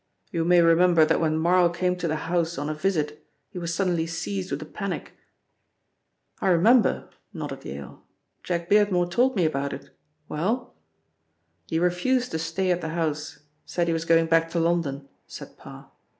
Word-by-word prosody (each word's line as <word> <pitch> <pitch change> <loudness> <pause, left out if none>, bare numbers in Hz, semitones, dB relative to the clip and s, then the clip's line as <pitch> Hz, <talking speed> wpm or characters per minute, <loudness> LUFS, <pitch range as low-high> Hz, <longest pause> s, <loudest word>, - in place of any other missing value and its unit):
You 165 -4 -1
may 175 0 +5
remember 165 -1 +5
that - - +1
when 155 -1 +1
Marl 175 +2 +4
came 180 +1 0
to 180 - -2
the 155 - -1
house 170 +1 -1
on 145 +2 -2
a - - -2
visit 155 -3 -2 0.3
he 180 - -6
was 170 -1 -3
suddenly 170 -2 0
seized 100 - -4
with - - -3
a - - -10
panic." - - -5 1.3
"I - - -1
remember," 215 +7 +4 0.2
nodded - - -6
Yale. 70 +1 -8 0.4
"Jack 170 -1 -3
Beardmore 195 -4 +3
told 255 +6 +2
me 180 -5 +2
about 140 -2 -1
it. - - -10 0.4
Well?" 220 +11 -2 0.9
"He 160 - -1
refused 180 +9 +1
to 160 - -2
stay 170 +4 -1
at 180 0 0
the 160 - -4
house, 155 -3 -3 0.2
said 175 - -1
he 165 - 0
was 165 0 -2
going 165 0 +4
back 165 0 +2
to 170 - -1
London," 165 -5 0 0.2
said - - -10
Parr. - - -13
170 Hz, 175 wpm, -25 LUFS, 160-180 Hz, 1.3 s, may